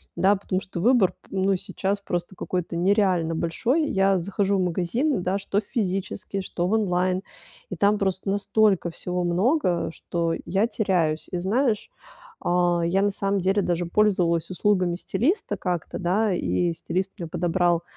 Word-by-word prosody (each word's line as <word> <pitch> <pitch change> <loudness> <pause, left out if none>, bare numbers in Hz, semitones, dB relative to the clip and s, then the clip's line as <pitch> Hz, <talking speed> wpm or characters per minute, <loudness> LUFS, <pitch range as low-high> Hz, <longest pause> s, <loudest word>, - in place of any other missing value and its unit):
Да, 195 +2 +4
потому 190 -1 -2
что 185 -2 -7
выбор 220 -2 +4
п - - -24
ну, 195 0 +1
сейчас 195 +2 -2
просто 175 -1 -4
какой-то 175 -1 -3
нереально 180 -3 +2
большой. 245 - 0
Я 195 0 +3
захожу 200 +2 0
в 185 - +1
магазины, 190 - 0
да, 185 +2 0
что 200 0 -1
в 210 - -8
физический, 195 -3 -3
что 175 -2 -3
в - - -2
онлайн, 185 -3 +1 0.5
и - - -4
там 205 +1 +3
просто 190 -1 -1
настолько 205 -2 +2
всего 180 +1 -3
много, 180 - +1
что 170 -1 -2
я 195 +4 +1
теряюсь. 215 -4 -1 0.4
И 180 - -2
знаешь, 215 - 0 0.5
а, 175 -1 +2
я 190 +3 +2
на 205 - +3
самом 200 0 -1
деле 195 +3 +2
даже 175 -1 -1
пользовалась 175 -4 +2
услугами 185 -2 +1
стилиста 285 - -1
как-то, 175 -3 -3
да, 195 +4 +1
и 175 -1 0
стилист 185 +3 -3
мне 170 -4 -5
подобрал, 175 +1 +1
190 Hz, 160 wpm, -25 LUFS, 175-205 Hz, 0.5 s, Да